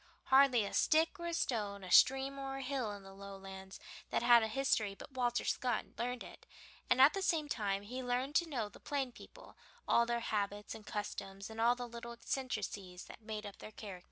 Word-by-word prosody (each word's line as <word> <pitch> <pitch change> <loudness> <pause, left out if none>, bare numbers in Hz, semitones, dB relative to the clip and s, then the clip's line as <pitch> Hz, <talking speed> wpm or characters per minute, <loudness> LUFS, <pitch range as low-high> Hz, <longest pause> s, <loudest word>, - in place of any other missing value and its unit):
Hardly 265 -5 +6
a - - -6
stick 325 +4 +3
or 340 - -4
a 340 - -2
stone, 205 - -1
a 185 - -7
stream 270 +4 +5
or 270 0 -4
a 270 - -4
hill 260 -5 -2
in 200 -1 -9
the 195 0 -12
Lowlands 195 -1 -9 0.3
that - - 0
had 240 -1 +8
a 220 - +1
history 220 -4 +1
but 280 - -11
Walter 245 -2 0
Scott 245 -3 0
learned 245 +1 -2
it, - - -13 0.4
and 250 - +4
at 270 +3 +8
the 390 - -2
same 330 -5 +1
time 200 -7 -1
he 250 +5 -5
learned 250 +3 -1
to 345 -2 0
know 240 -8 -1
the - - -15
plain 275 -3 -2
people, - - -14 0.3
all 235 0 +4
their 235 0 0
habits 205 -2 -2
and 215 -2 -11
customs, 205 -1 -5
and 220 0 -4
all 240 +2 +5
the 245 0 -5
little 235 0 -7
eccentricities 210 -7 -4
that - - -12
made 215 -1 -5
up 205 - -9
their - - -8
characters. 205 -4 -8
235 Hz, 210 wpm, -35 LUFS, 205-265 Hz, 0.4 s, had